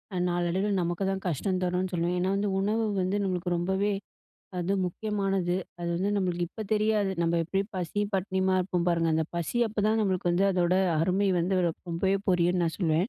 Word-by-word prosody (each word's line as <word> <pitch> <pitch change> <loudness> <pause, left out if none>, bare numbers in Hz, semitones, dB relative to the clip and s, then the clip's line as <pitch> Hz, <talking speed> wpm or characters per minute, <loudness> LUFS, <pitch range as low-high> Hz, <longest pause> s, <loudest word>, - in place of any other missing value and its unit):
அ - - -1
நாளடைவில 175 +4 0
நமக்கு 175 +3 -1
தான் 190 0 -4
கஷ்டம் 185 +4 -1
தரும்ன்னு 180 +1 -1
சொல்லுவேன். 175 +1 0
ஏன்னா 185 +2 +1
வந்து 200 0 0
உணவு 220 +3 +1 0.2
வந்து 185 +3 0
நம்மளுக்கு 180 -2 -1
ரொம்பவே 190 +4 0 0.7
அது 180 +3 0
முக்கியமானது. 195 -2 -1 0.2
அது 170 - -2
வந்து 195 +3 0
நம்மளுக்கு 175 -2 0
இப்ப 220 - -6
தெரியாது. 210 -2 +2
நம்ம 170 0 +2
எப்படியும் 195 +5 -2
பசி, 185 +3 -2 0.2
பட்டினியுமா 190 0 +1
இருப்போம் 180 -1 -1
பாருங்க, 165 -1 +2
அந்த 160 -1 +1
பசி 170 +8 -1
அப்பதான் 215 +1 +1
நம்மளுக்கு 185 -3 0
வந்து 190 +3 +3
அதோட 180 0 +2 0.3
அருமை 190 +4 +2
வந்து 185 +1 +1
ரொம் 165 - -5
ரொம்பவே 190 +4 +1
புரியும்ன்னு 175 -1 +3
நான் 165 - -2
சொல்லுவேன். 170 +1 +1
185 Hz, 180 wpm, -28 LUFS, 175-195 Hz, 0.7 s, வந்து